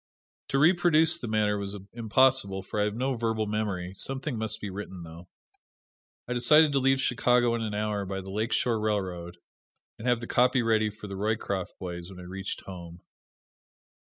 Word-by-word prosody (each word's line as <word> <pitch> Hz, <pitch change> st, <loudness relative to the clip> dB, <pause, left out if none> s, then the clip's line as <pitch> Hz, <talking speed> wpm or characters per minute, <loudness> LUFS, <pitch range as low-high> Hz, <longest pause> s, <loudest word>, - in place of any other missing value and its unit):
To 135 Hz, -, 0 dB
reproduce 165 Hz, +1 st, +5 dB
the 120 Hz, -, -5 dB
matter 105 Hz, -1 st, +1 dB
was 100 Hz, 0 st, -4 dB, 0.2 s
impossible, 115 Hz, -4 st, +2 dB
for 105 Hz, +2 st, -3 dB
I -, -, +3 dB
have 105 Hz, 0 st, -2 dB
no 130 Hz, +3 st, 0 dB
verbal 115 Hz, -2 st, -1 dB
memory 100 Hz, -4 st, -3 dB
something 135 Hz, +6 st, -2 dB
must 110 Hz, -1 st, -4 dB
be 100 Hz, -, -5 dB
written, 95 Hz, -2 st, -7 dB
though. 85 Hz, +2 st, -11 dB, 1.0 s
I 125 Hz, -, -2 dB
decided 150 Hz, +6 st, +5 dB
to 140 Hz, -, +2 dB
leave 135 Hz, 0 st, +3 dB
Chicago 125 Hz, -1 st, +2 dB
in 115 Hz, -, -1 dB
an 110 Hz, -2 st, -3 dB
hour 105 Hz, -1 st, -1 dB
by 95 Hz, 0 st, -4 dB
the 95 Hz, 0 st, -9 dB
Lake 110 Hz, +3 st, -2 dB
Shore 115 Hz, -3 st, +1 dB
Railroad, 90 Hz, -5 st, -2 dB, 0.6 s
and 115 Hz, -, -5 dB
have 120 Hz, -1 st, +3 dB
the 115 Hz, -, -6 dB
copy 125 Hz, +1 st, +3 dB
ready 110 Hz, -1 st, +2 dB
for 105 Hz, 0 st, -11 dB
the 100 Hz, -1 st, -6 dB
Roycroft 100 Hz, -2 st, -2 dB
boys 85 Hz, -1 st, -6 dB
when 95 Hz, -2 st, -11 dB
I -, -, -9 dB
reached 95 Hz, +2 st, -6 dB
home. 85 Hz, -2 st, -10 dB
110 Hz, 185 wpm, -28 LUFS, 95-120 Hz, 1.0 s, reproduce